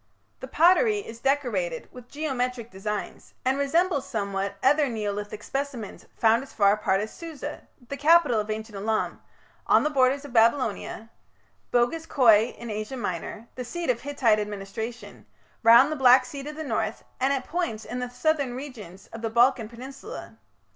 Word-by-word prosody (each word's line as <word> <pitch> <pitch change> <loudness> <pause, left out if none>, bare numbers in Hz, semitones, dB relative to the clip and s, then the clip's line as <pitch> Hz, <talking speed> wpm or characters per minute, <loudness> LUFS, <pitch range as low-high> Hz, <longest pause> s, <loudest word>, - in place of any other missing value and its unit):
The 260 - -7
pottery 370 - +4
is 230 - -10
decorated 235 - -1
with 250 -1 -13
geometric 250 -5 -3
designs, 205 +2 -5
and 260 +1 +2
resembles 290 +1 +1
somewhat 200 -2 -2
other 290 +1 +4
Neolithic 210 -2 -4
specimens 270 -7 -5
found 225 +1 +4
as 270 - -11
far 200 -2 +4
apart 205 -2 +1
as 215 - -5
Susa, 330 -4 -8 0.2
the 280 - -5
capital 295 -5 +5
of 210 0 -3
ancient 215 0 -5
Elam, 215 +2 -2 0.5
on - - +5
the 300 - 0
borders 275 +1 +2
of 275 - -10
Babylonia, 230 -1 +1 0.6
Boghaz 245 +7 +1
Köi 230 -3 +4
in 235 -2 -7
Asia 215 +5 -4
Minor, 210 +1 -5
the 255 - -5
seat 335 +4 -1
of 240 -1 -5
Hittite 255 -7 +2
administration, 210 +3 -6 0.3
round 235 +6 +7
the - - -1
Black 255 0 +7
Sea 280 +2 -7
to 295 +2 -6
the 310 +1 -6
north, 235 -7 -2 0.2
and 265 +2 +2
at 270 -2 -1
points 320 -11 -3
in 250 - -5
the 250 0 -3
southern 275 0 0
regions 225 -9 -9
of 225 - -7
the 225 - -2
Balkan 235 -1 +3
Peninsula. 260 +4 -10
245 Hz, 165 wpm, -26 LUFS, 215-280 Hz, 0.6 s, round